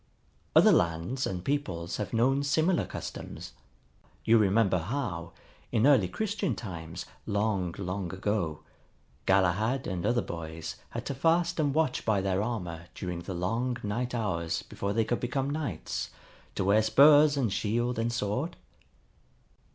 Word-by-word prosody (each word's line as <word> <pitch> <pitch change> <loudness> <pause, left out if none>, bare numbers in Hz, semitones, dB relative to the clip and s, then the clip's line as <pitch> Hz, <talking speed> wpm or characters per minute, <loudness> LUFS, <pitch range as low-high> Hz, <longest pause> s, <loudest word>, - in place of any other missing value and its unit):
Other - - +8
lands 85 +10 +1
and 90 -1 -4
peoples 95 -13 -2
have 105 -4 -4
known 130 +4 +2
similar 160 +5 +2
customs. - - -7 0.7
You 115 +1 +6
remember 100 -2 +3
how, 85 - -3 0.4
in 115 0 +3
early 130 -10 +5
Christian 205 - -2
times, 85 -4 -7 0.2
long, 100 -4 0
long 90 -1 -3
ago, 95 -5 -2 0.7
Galahad 100 +7 +2
and 90 -3 -3
other 120 -1 +2
boys 80 -1 -6
had - - -5
to - - -2
fast 170 +5 +2
and 145 -2 +2
watch 155 -3 +1
by 110 -3 +2
their 95 0 0
armor 90 -7 -4
during 90 -2 -4
the 90 +2 -6
long 115 +8 -1
night 120 +4 -2
hours 85 -7 -1
before 100 - -4
they 110 +2 +1
could 120 - -1
become 135 +3 -1
knights, 140 - -3 0.5
to - - 0
wear 100 +3 +4
spurs 145 +6 +6
and 120 -8 +1
shield 115 +4 0
and 115 +1 0
sword? 120 +7 -2
110 Hz, 145 wpm, -29 LUFS, 90-130 Hz, 0.7 s, Other